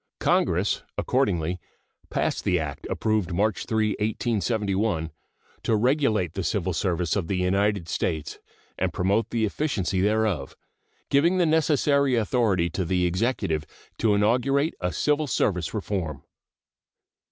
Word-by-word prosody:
Congress -, -, +1 dB, 0.2 s
accordingly 90 Hz, -2 st, 0 dB, 0.5 s
passed -, -, -1 dB
the 90 Hz, -, +2 dB
act 75 Hz, -3 st, -5 dB
approved 110 Hz, -4 st, 0 dB
March 105 Hz, 0 st, 0 dB
3, 110 Hz, -1 st, +1 dB
1871, 105 Hz, -5 st, -1 dB, 0.5 s
"to 115 Hz, -, +1 dB
regulate 110 Hz, -, +1 dB
the 95 Hz, -, -3 dB
civil 95 Hz, -2 st, -1 dB
service 90 Hz, -1 st, 0 dB
of 95 Hz, -5 st, -1 dB
the 95 Hz, -, -1 dB
United 95 Hz, 0 st, +1 dB
States 80 Hz, -2 st, -2 dB, 0.4 s
and -, -, 0 dB
promote 100 Hz, +5 st, +1 dB
the 115 Hz, -2 st, +1 dB
efficiency 100 Hz, -, -1 dB
thereof," 105 Hz, -8 st, 0 dB, 0.6 s
giving 170 Hz, +7 st, +4 dB
the 180 Hz, -, +3 dB
necessary 145 Hz, -4 st, +3 dB
authority 110 Hz, -6 st, +1 dB
to 90 Hz, +3 st, -2 dB
the 90 Hz, +1 st, +1 dB
Executive 90 Hz, -4 st, 0 dB, 0.4 s
to 110 Hz, -2 st, +3 dB
inaugurate 130 Hz, +8 st, +2 dB
a 90 Hz, 0 st, 0 dB
civil 150 Hz, +6 st, +1 dB
service 90 Hz, -, 0 dB
reform. 90 Hz, -9 st, -3 dB
105 Hz, 125 wpm, -25 LUFS, 90-115 Hz, 0.6 s, giving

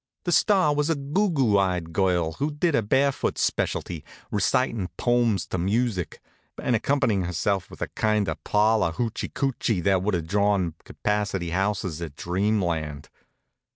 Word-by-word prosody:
The 175 Hz, -, -1 dB
star 185 Hz, -2 st, +4 dB
was 150 Hz, +1 st, 0 dB
a 165 Hz, -, +2 dB
googoo 140 Hz, -, +1 dB
eyed 90 Hz, -3 st, -1 dB
girl 90 Hz, -3 st, +1 dB
who 145 Hz, +2 st, +1 dB
did 155 Hz, +3 st, 0 dB
a 115 Hz, -, +3 dB
barefoot 135 Hz, +6 st, +1 dB
specialty, 85 Hz, -4 st, -1 dB, 0.3 s
recitin' 105 Hz, 0 st, +1 dB
pomes 120 Hz, -5 st, +2 dB
to 95 Hz, -, -2 dB
music, 100 Hz, 0 st, -1 dB, 0.4 s
and 125 Hz, -, +1 dB
accompanyin' 110 Hz, -6 st, +1 dB
herself 95 Hz, +2 st, -1 dB
with -, -, -6 dB
a -, -, -2 dB
kind 105 Hz, -2 st, +1 dB
of -, -, -4 dB
parlor 105 Hz, -4 st, +2 dB
hoochee 115 Hz, +4 st, -3 dB
coochee 125 Hz, -7 st, 0 dB
that 95 Hz, -1 st, +3 dB
would 100 Hz, 0 st, 0 dB
have 85 Hz, -2 st, -2 dB
drawn 100 Hz, -2 st, +1 dB
capacity 100 Hz, -4 st, -2 dB
houses 95 Hz, -3 st, -1 dB
at 80 Hz, -4 st, -6 dB
Dreamland. 85 Hz, -6 st, -1 dB
105 Hz, 150 wpm, -25 LUFS, 90-125 Hz, 0.4 s, star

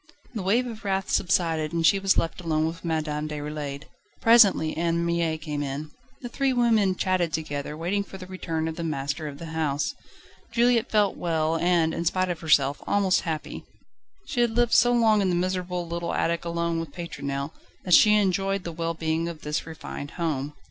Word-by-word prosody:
The 220 Hz, -, -3 dB
wave 220 Hz, +7 st, +2 dB
of 225 Hz, -3 st, -8 dB
wrath 195 Hz, -1 st, -1 dB
subsided, 165 Hz, -4 st, +1 dB
and 165 Hz, -1 st, +1 dB
she 195 Hz, -, +5 dB
was 195 Hz, 0 st, +2 dB
left 165 Hz, +2 st, -1 dB
alone 155 Hz, -2 st, 0 dB
with 165 Hz, +1 st, -5 dB
Madame 155 Hz, -2 st, -2 dB
Déroulède: 150 Hz, -1 st, -5 dB, 0.4 s
presently 210 Hz, -9 st, +5 dB
Anne 170 Hz, +1 st, 0 dB
Mie 170 Hz, -2 st, 0 dB
came 150 Hz, -2 st, -4 dB
in. 145 Hz, +2 st, -4 dB, 0.3 s
The -, -, -3 dB
three 270 Hz, +2 st, 0 dB
women 225 Hz, -6 st, +3 dB
chatted 185 Hz, -3 st, 0 dB
together, 150 Hz, -1 st, -4 dB
waiting 185 Hz, +5 st, -1 dB
for 195 Hz, -, -10 dB
the 185 Hz, -, -9 dB
return 165 Hz, -4 st, -3 dB
of 160 Hz, -, -5 dB
the 170 Hz, -, -3 dB
master 150 Hz, 0 st, -3 dB
of 140 Hz, -1 st, -7 dB
the 160 Hz, +1 st, -8 dB
house. 150 Hz, -3 st, -1 dB, 0.6 s
Juliette 235 Hz, -1 st, +3 dB
felt 210 Hz, -2 st, +2 dB
well 160 Hz, -1 st, 0 dB
and, 170 Hz, -2 st, +2 dB
in 170 Hz, -, -3 dB
spite 185 Hz, +2 st, +1 dB
of 170 Hz, -, -5 dB
herself, 145 Hz, -3 st, +2 dB
almost 195 Hz, -2 st, +2 dB
happy. 155 Hz, -1 st, -5 dB, 0.6 s
She 245 Hz, -, -1 dB
had 235 Hz, -2 st, +1 dB
lived 240 Hz, -1 st, +3 dB
so 245 Hz, +2 st, +6 dB
long 225 Hz, -3 st, +4 dB
in 190 Hz, -, +1 dB
the 180 Hz, -, +1 dB
miserable, 180 Hz, -1 st, -2 dB
little 170 Hz, 0 st, -3 dB
attic 170 Hz, 0 st, 0 dB
alone 170 Hz, 0 st, -1 dB
with 165 Hz, -2 st, -5 dB
Pétronelle 140 Hz, -4 st, -4 dB, 0.3 s
that 180 Hz, -, +1 dB
she 210 Hz, +4 st, +7 dB
enjoyed 195 Hz, -1 st, +1 dB
the 170 Hz, -, -5 dB
well 165 Hz, 0 st, -3 dB
being 160 Hz, +1 st, -1 dB
of 160 Hz, -2 st, -9 dB
this 150 Hz, +2 st, -3 dB
refined 160 Hz, -3 st, -7 dB
home. 150 Hz, -4 st, -2 dB
170 Hz, 190 wpm, -26 LUFS, 155-195 Hz, 0.6 s, she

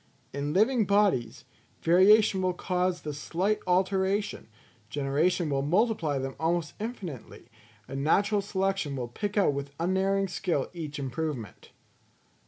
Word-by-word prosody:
In 140 Hz, +1 st, -2 dB
living 220 Hz, -, +3 dB
bodies, 130 Hz, -, +1 dB, 0.4 s
variation 190 Hz, +3 st, +5 dB
will 185 Hz, -1 st, 0 dB
cause 180 Hz, -1 st, -1 dB
the 150 Hz, -, -4 dB
slight 180 Hz, +8 st, -1 dB
alteration, 190 Hz, +2 st, 0 dB, 0.4 s
generation 145 Hz, +7 st, 0 dB
will 135 Hz, -1 st, +1 dB
multiply 170 Hz, -, +1 dB
them 135 Hz, 0 st, -4 dB
almost 165 Hz, -2 st, 0 dB
infinitely, 185 Hz, -, -7 dB, 0.4 s
and 135 Hz, +1 st, -4 dB
natural 200 Hz, +6 st, +2 dB
selection 195 Hz, -6 st, -1 dB
will 125 Hz, -2 st, -3 dB
pick 205 Hz, -, -4 dB
out 195 Hz, -8 st, +4 dB
with 140 Hz, 0 st, -6 dB
unerring 190 Hz, +3 st, +1 dB
skill 175 Hz, -6 st, -2 dB
each 155 Hz, -3 st, -6 dB
improvement. 135 Hz, -3 st, -5 dB
175 Hz, 125 wpm, -28 LUFS, 140-195 Hz, 0.4 s, variation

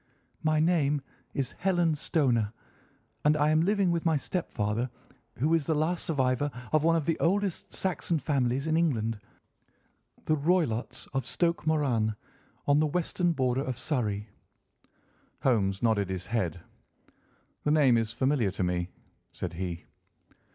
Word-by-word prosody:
"My 155 Hz, 0 st, +2 dB
name 155 Hz, -3 st, +2 dB, 0.4 s
is 135 Hz, -2 st, -1 dB
Helen 175 Hz, -3 st, +2 dB
Stoner, 125 Hz, -8 st, +1 dB, 0.7 s
and 150 Hz, +1 st, +4 dB
I 150 Hz, +1 st, +3 dB
am 155 Hz, +1 st, +4 dB
living 195 Hz, 0 st, +2 dB
with 170 Hz, -1 st, 0 dB
my 160 Hz, -2 st, +3 dB
stepfather, 120 Hz, -, -2 dB, 0.5 s
who 150 Hz, +7 st, +2 dB
is 160 Hz, -4 st, +2 dB
the 160 Hz, -, +2 dB
last 160 Hz, +3 st, 0 dB
survivor 135 Hz, -2 st, +1 dB, 0.2 s
of 155 Hz, -1 st, +4 dB
one 165 Hz, +1 st, +4 dB
of 160 Hz, -3 st, 0 dB
the 165 Hz, -, 0 dB
oldest 195 Hz, +1 st, 0 dB
Saxon 175 Hz, -2 st, -1 dB
families 135 Hz, -2 st, 0 dB
in 160 Hz, 0 st, +1 dB
England, 115 Hz, -10 st, +1 dB, 1.1 s
the 155 Hz, -, +3 dB
Roylotts 150 Hz, -7 st, 0 dB
of 135 Hz, -1 st, 0 dB
Stoke 170 Hz, +6 st, -1 dB
Moran, 125 Hz, -9 st, +1 dB, 0.5 s
on 145 Hz, +1 st, +4 dB
the 155 Hz, -, +3 dB
western 175 Hz, +2 st, 0 dB
border 130 Hz, -2 st, +1 dB
of 130 Hz, -4 st, -3 dB
Surrey." 105 Hz, -8 st, -1 dB, 1.2 s
Holmes 100 Hz, -6 st, +2 dB
nodded 105 Hz, -4 st, +2 dB
his 95 Hz, -1 st, -3 dB
head. 90 Hz, -8 st, -2 dB, 1.0 s
"The -, -, +1 dB
name 145 Hz, -5 st, +5 dB
is 115 Hz, -1 st, +1 dB
familiar 130 Hz, -2 st, +1 dB
to 95 Hz, 0 st, -3 dB
me," 90 Hz, 0 st, -1 dB, 0.4 s
said -, -, -5 dB
he. 85 Hz, -1 st, -4 dB
145 Hz, 145 wpm, -29 LUFS, 115-160 Hz, 1.2 s, name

